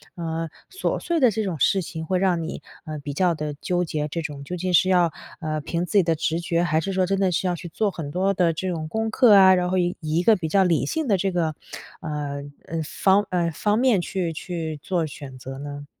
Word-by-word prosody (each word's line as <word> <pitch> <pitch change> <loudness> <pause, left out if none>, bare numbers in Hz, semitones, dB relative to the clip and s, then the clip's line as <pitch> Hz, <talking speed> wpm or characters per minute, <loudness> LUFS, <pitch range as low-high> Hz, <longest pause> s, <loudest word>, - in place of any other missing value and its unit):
呃， 165 -1 -3 0.2
琐 380 - -1
碎 340 -2 0
的 250 -5 +5
这 220 +2 -1
种 175 -7 -3
事 190 +8 +3
情 160 -1 -6
会 185 +2 0
让 180 -3 +2
你， 160 - -5 0.2
呃， 155 -1 -5
比 145 0 -5
较 175 +2 +2
地 150 -1 -4
纠 180 0 0
结， 150 -2 -2
这 165 +3 -3
种 145 -3 -6
究 180 +5 -5
竟 180 +1 -2
是 185 +2 +5
要， 175 -3 +4 0.3
呃， 155 -1 -2
凭 170 +3 -2
自 - - -8
己 190 - +6
的 165 -1 +1
直 160 +1 -1
觉， 170 0 0
还 160 -2 +2
是 195 +4 -3
说 185 -1 +2
真 195 +1 0
的 190 -2 +2
是 185 +2 0
要 175 - 0
去 175 +1 -8
做 205 +5 0
很 155 -5 -6
多 190 +3 +1
的 175 -3 +2
这 185 +3 -3
种 160 -3 -3
功 220 +6 -1
课 235 -3 +6
啊， 190 -1 +8
然 180 0 0
后 185 - +1
以 175 0 +1
以 155 0 -2
一 175 - +2
个 220 +2 +6
比 165 -4 -3
较 195 +4 +4
理 170 -4 +2
性 320 -4 -2
的 200 -3 +3
这 195 +1 0
个， 165 -3 0 0.5
呃， 145 -2 -4 0.3
嗯， 165 0 -2
方 195 +5 +2
呃， 170 -2 +1
方 210 +7 0
面 250 -7 +4
去 175 -2 -2
去 160 -2 -5
做 175 -4 0
选 140 -3 -9
择 135 +1 -8
呢？ 145 0 -7
175 Hz, 270 characters per minute, -24 LUFS, 155-190 Hz, 0.5 s, 啊